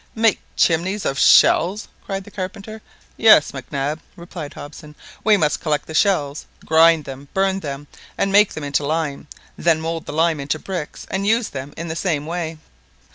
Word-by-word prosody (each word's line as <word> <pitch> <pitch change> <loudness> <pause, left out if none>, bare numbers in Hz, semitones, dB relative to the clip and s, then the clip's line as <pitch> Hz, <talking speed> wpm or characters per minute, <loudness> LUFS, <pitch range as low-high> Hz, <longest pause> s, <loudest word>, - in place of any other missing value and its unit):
"Make 225 -2 +3 0.2
chimneys 185 +5 +1
of 135 +1 -1
shells!" 195 +6 +5 0.2
cried 195 0 -4
the 210 - -14
carpenter. 200 +3 -7 0.4
"Yes, 220 -9 +6
Mac 135 -2 -9
Nab," 145 +2 -2
replied 170 -3 -9
Hobson; 150 +1 -11 0.3
"we 215 -1 +5
must 150 -5 +1
collect 150 -3 -1
the 160 - -9
shells, 155 -5 +1 0.2
grind 160 -1 +5
them, 135 +1 -9
burn 195 0 +1
them, 145 -4 -6 0.3
and 195 - 0
make 205 +1 +5
them 155 - -6
into 145 +1 -1
lime, 150 -1 -2 0.3
then 165 -1 +3
mould 165 0 -4
the - - -4
lime 165 0 +2
into 140 +2 -2
bricks, 175 -2 -6
and 195 +1 -1
use 225 +1 +2
them 135 +1 -7
in 165 +1 -5
the 160 - -4
same 160 -4 -1
way." 165 -1 -4
165 Hz, 180 wpm, -20 LUFS, 150-195 Hz, 0.4 s, Yes